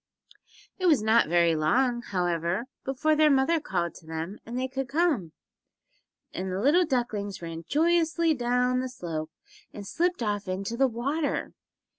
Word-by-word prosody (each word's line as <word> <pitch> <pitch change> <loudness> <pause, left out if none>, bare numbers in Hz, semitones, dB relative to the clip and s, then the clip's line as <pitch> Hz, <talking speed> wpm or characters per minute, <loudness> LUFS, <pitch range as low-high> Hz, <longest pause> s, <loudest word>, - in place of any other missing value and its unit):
It 370 - +1
was 295 -10 +4
not 220 -5 +4
very 170 -1 +3
long, 240 +11 +1
however, 175 0 -1 0.2
before 275 +4 +1
their 305 0 +5
mother 275 +4 +3
called 175 - -2
to 160 - -15
them 160 +5 -5
that 235 - -7
they 255 +1 -1
could 265 0 -4
come, 290 - +1 1.0
and 185 0 -4
the 185 - -2
little 305 - +4
ducklings 215 - -2
ran 165 0 -6
joyously 330 +1 +2
down 250 -1 +1
the 255 0 -3
slope 165 -9 -5 0.4
and 205 - -9
slipped 350 - -1
off 205 -2 -2
into 195 +4 -3
the 270 +2 +3
water. 275 +6 -2
240 Hz, 155 wpm, -27 LUFS, 185-285 Hz, 1.0 s, their